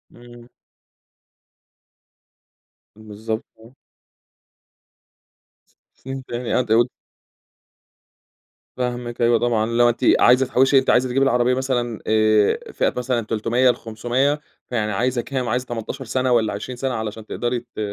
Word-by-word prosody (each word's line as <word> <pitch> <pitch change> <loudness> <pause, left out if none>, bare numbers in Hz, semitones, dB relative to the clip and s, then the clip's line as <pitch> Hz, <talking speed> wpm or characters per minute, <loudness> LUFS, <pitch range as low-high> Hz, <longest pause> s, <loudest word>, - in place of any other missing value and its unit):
امم. 120 0 -15 2.5
بالضبط، 110 +1 -5 0.2
آه. 115 +3 -17 2.3
فهمت 135 0 -7
يعني، 120 0 -3
قد 120 -3 -1
أقول 120 +2 +4 1.9
فاهمِك 120 -1 -4
أيوه 120 -1 +4
طبعًا، 115 -2 +1
اللي 115 +1 +2
هو 120 - +5
أنتِ 120 - -2 0.2
عايزة 125 +2 +5
تحوشي 135 +2 +4
أنتِ 130 - -2
عايزة 125 +1 +3
تجيبي 135 +2 +2
العربية 125 -1 +2
مثلًا 125 -3 -2
آآ 110 -1 +2
فئة - - 0
مثلًا 125 -1 0
300 115 +4 +1
ل500 120 +5 -1 0.3
فيعني 110 -3 -1
عايزة 120 +4 0
كام، 130 -1 -3
عايزة 125 +2 -1
18 120 +3 -6
سنة 130 +2 0
والّا 115 -3 +2
20 105 +5 -6
سنة 130 +1 -2
علشان 110 -1 -5
تقدري 120 +2 -2 0.2
ت - - -7
120 Hz, 125 wpm, -21 LUFS, 110-125 Hz, 2.5 s, هو